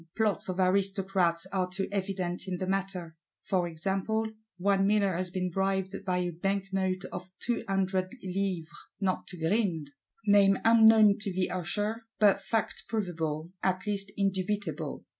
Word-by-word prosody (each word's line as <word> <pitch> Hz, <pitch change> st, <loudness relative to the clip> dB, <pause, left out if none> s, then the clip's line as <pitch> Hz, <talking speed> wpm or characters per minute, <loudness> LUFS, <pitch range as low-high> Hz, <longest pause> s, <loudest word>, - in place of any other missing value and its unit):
Plots 215 Hz, -4 st, +1 dB
of 185 Hz, +1 st, -3 dB
Aristocrats 190 Hz, -2 st, +2 dB
are 185 Hz, -2 st, 0 dB
too 190 Hz, +1 st, -2 dB
evident 190 Hz, -2 st, -2 dB
in 185 Hz, -1 st, -2 dB
the 185 Hz, -, -2 dB
matter; 185 Hz, -3 st, -2 dB, 0.3 s
for 180 Hz, -3 st, +1 dB
example, 195 Hz, +6 st, -1 dB, 0.3 s
one 195 Hz, +1 st, +2 dB
miller 200 Hz, -2 st, +3 dB
has 180 Hz, +1 st, -1 dB
been 180 Hz, 0 st, -2 dB
bribed 190 Hz, +1 st, 0 dB
"by 185 Hz, -2 st, 0 dB
a 180 Hz, -1 st, -1 dB
banknote 195 Hz, +1 st, -1 dB
of 180 Hz, +1 st, -6 dB
200 195 Hz, -5 st, 0 dB
livres" 185 Hz, -3 st, -2 dB, 0.3 s
not 190 Hz, -2 st, -1 dB
to 180 Hz, -, -6 dB
grind,—name 195 Hz, +3 st, +1 dB
unknown 220 Hz, -2 st, +7 dB
to 205 Hz, -1 st, -3 dB
the 185 Hz, 0 st, -1 dB
Usher, 210 Hz, +5 st, -2 dB
but 200 Hz, -2 st, +4 dB
fact 220 Hz, +2 st, -2 dB
provable, 165 Hz, -6 st, -2 dB
at 185 Hz, +1 st, 0 dB
least 200 Hz, -1 st, -1 dB
indubitable. 190 Hz, -5 st, -2 dB
190 Hz, 140 wpm, -29 LUFS, 180-200 Hz, 0.3 s, unknown